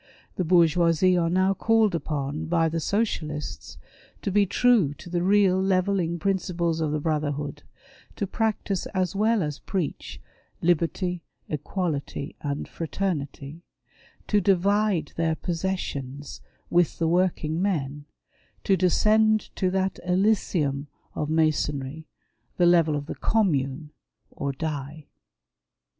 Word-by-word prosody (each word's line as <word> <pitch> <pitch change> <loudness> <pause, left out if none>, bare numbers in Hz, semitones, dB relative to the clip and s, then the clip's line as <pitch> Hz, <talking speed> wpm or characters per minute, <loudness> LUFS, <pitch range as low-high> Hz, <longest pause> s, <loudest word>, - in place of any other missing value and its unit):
The 185 - 0
Bourgeoisie 170 +1 +4
are 170 -2 +2
now 185 +2 +3
called 220 -1 +2
upon 150 -1 -3
by 165 -1 +2
the 165 +1 -2
Socialists 150 - -3 0.5
to 195 - -1
be 200 +1 +3
true 210 - +3
to 175 - -12
the 175 -1 0
real 190 0 +4
levelling 185 -2 +1
principles 170 -2 -1
of 155 -2 0
the 155 - 0
brotherhood 150 -2 -2 0.3
— - - -25
to 205 - -2
practise 210 -2 -1
as 185 0 0
well 215 0 +2
as 150 -1 -4
preach 185 -7 -4 0.4
"liberty, 175 +1 0 0.3
equality, 150 -2 -3
and 145 -1 -3
fraternity"; 160 -3 -4 0.6
to 210 -1 +2
divide 195 -2 +2
their 165 -1 +1
possessions 155 -6 -4 0.3
with 175 -2 +2
the 165 - +1
working 170 -2 +1
men 145 -7 -1 0.3
— - - -37
to 195 - +3
descend 215 +4 +3
to 185 - +1
that 190 0 -1
elysium 180 -7 +1 0.3
of 150 - -3
Masonry, 155 -2 0 0.5
the 175 - +4
level 170 -3 +4
of 145 0 -3
the - - -5
Commune 150 -8 0 0.2
— - - -47
or 140 - -3
die. 150 0 -5
170 Hz, 125 wpm, -25 LUFS, 150-190 Hz, 0.6 s, Bourgeoisie